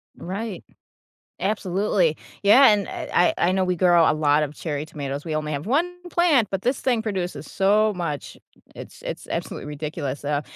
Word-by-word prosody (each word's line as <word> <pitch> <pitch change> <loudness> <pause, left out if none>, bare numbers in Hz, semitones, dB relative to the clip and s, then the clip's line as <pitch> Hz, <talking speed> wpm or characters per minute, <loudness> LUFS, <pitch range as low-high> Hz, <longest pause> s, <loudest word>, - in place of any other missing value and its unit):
Right, 200 +3 -5 0.8
absolutely, 190 -4 +1 0.3
yeah, 230 +7 +7
and 205 -2 +2
I 175 - +1
I 175 - +2
know 190 0 +1
we 180 -1 0
grow 175 -2 +5
a - - +3
lot 150 0 +2
of 150 0 -3
cherry 150 -2 -4
tomatoes, 145 -2 -5
we 160 - -3
only 155 0 -2
have 145 +3 -4
1 285 +9 +2 0.2
plant, 305 - +3
but 195 -1 -3
this 250 +2 0
thing 245 -4 +1
produces 180 -9 -4
so 210 +2 +3
much, 160 -5 -4 0.4
it's - - -11
it's - - -6
absolutely - - -4
ridiculous, 150 -2 -5
uh, 145 0 0
175 Hz, 170 wpm, -23 LUFS, 150-210 Hz, 0.8 s, yeah